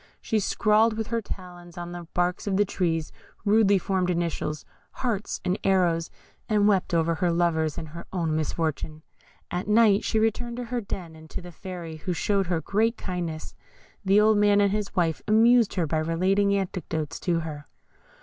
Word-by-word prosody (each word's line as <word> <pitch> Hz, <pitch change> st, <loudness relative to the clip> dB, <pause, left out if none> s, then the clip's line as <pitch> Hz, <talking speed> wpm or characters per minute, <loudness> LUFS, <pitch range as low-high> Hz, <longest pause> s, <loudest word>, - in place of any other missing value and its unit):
She 220 Hz, -, 0 dB
scrawled 215 Hz, +2 st, +2 dB
with 225 Hz, -1 st, -3 dB
her 230 Hz, -1 st, 0 dB
talons 175 Hz, -3 st, -9 dB
on 175 Hz, 0 st, -6 dB
the 175 Hz, -1 st, -8 dB
barks 180 Hz, +3 st, 0 dB
of 190 Hz, -1 st, +1 dB
the 205 Hz, -, +4 dB
trees 165 Hz, -5 st, -1 dB, 0.3 s
rudely 205 Hz, -1 st, +5 dB
formed 185 Hz, -1 st, 0 dB
initials, 165 Hz, -3 st, -2 dB, 0.3 s
hearts 225 Hz, -5 st, -2 dB
and 180 Hz, +2 st, 0 dB
arrows, 175 Hz, -4 st, +2 dB, 0.4 s
and 210 Hz, -1 st, +3 dB
wept 195 Hz, -3 st, +2 dB
over 165 Hz, 0 st, +2 dB
her 175 Hz, +1 st, 0 dB
lover's 165 Hz, -2 st, +1 dB
and 160 Hz, -, -5 dB
her 170 Hz, +2 st, -9 dB
own 165 Hz, -4 st, -1 dB
misfortune. 155 Hz, 0 st, -2 dB, 0.5 s
At 180 Hz, +2 st, -3 dB
night 215 Hz, -1 st, +5 dB
she 220 Hz, -, 0 dB
returned 225 Hz, +2 st, 0 dB
to 245 Hz, -, -3 dB
her 240 Hz, 0 st, -3 dB
den, 180 Hz, -5 st, -6 dB
and 160 Hz, 0 st, -14 dB
to -, -, -5 dB
the 175 Hz, -1 st, -10 dB
Fairy, 170 Hz, -2 st, -7 dB
who 180 Hz, +3 st, -3 dB
showed 195 Hz, +2 st, 0 dB
her 170 Hz, -2 st, 0 dB
great 220 Hz, +8 st, +1 dB
kindness. 170 Hz, -4 st, -5 dB, 0.5 s
The 195 Hz, +1 st, +4 dB
old 215 Hz, 0 st, +4 dB
man 205 Hz, 0 st, +4 dB
and 200 Hz, -1 st, +3 dB
his 210 Hz, -1 st, -3 dB
wife 165 Hz, -3 st, +1 dB
amused 225 Hz, +1 st, +5 dB
her 175 Hz, -3 st, +1 dB
by 155 Hz, +1 st, 0 dB
relating 185 Hz, +5 st, +2 dB
anecdotes 165 Hz, -5 st, -3 dB
to 170 Hz, -2 st, 0 dB
her. 150 Hz, -2 st, -7 dB
180 Hz, 180 wpm, -26 LUFS, 165-205 Hz, 0.5 s, rudely